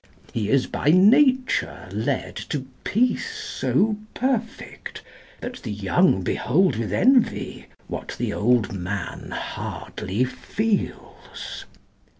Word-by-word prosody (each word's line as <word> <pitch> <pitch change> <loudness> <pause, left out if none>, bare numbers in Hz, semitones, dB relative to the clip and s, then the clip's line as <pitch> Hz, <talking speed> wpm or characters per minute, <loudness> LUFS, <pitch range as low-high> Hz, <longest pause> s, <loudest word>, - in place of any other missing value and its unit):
He 105 -3 -1
is 135 0 +3
by - - -4
nature 255 - +4
led - - -2
To - - -2 0.2
peace 250 - +1
so 215 - +1 0.2
perfect, 240 -3 -3 0.4
that 245 +1 -5
the 115 - -5
young 105 - +2
behold 170 - +2
With 110 -3 -2
envy, 250 - +2 0.2
what - - -6
the - - -1
old 115 -2 +2
man 95 -1 -4
hardly 100 +7 -3
feels. 210 - -3
180 Hz, 105 wpm, -24 LUFS, -, 0.4 s, nature